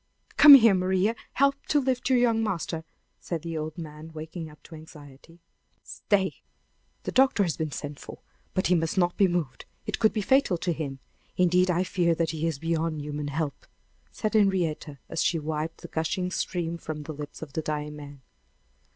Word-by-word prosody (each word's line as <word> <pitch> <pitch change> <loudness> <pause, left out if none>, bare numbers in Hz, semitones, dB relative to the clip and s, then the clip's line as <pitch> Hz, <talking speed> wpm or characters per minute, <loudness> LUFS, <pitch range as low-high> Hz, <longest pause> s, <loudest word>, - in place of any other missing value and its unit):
Come 290 -1 +11
here, 230 -5 +7
Maria! 190 +4 +1 0.2
Help 275 +1 +3
me - - -42
to 295 - +3
lift 260 -2 -1
your 260 - +4
young 230 -2 +3
master," 165 -5 -3 0.3
said 165 -3 -5
the 165 -1 -5
old 155 +1 -4
man, 155 -1 -9
waking 160 +1 -7
up 150 - -18
to - - -14
anxiety. 155 +1 -14 0.4
"Stay! 190 -6 -1 0.6
The - - -3
doctor 265 -5 +4
has 170 -4 -1
been 155 -2 -3
sent 145 0 -6
for; - - -10 0.4
but 185 - +1
he 180 - +3
must 165 +2 0
not 175 -1 +2
be 195 - +4
moved; 175 -7 -3 0.2
it - - -3
would 220 - +5
be 215 - -2
fatal 265 -4 +3
to 175 +1 -1
him. 145 -4 -5 0.4
Indeed, 180 +1 +3
I 180 +1 +2
fear 175 -2 +1
that 165 -1 0
he 160 0 -2
is 160 -4 -2
beyond 165 0 -1
human 145 0 -4
help," 145 0 -4 0.4
said 215 0 -3
Henrietta, 180 -8 +1
as - - -2
she 170 - +1
wiped 155 +1 -4
the - - -8
gushing 180 +3 -2
stream 170 -2 -2
from 155 -2 -6
the 155 +2 -6
lips 150 +1 -8
of 145 -3 -10
the 160 - -1
dying 150 -1 -4
man. 145 -2 -11
165 Hz, 195 wpm, -27 LUFS, 155-190 Hz, 0.6 s, Come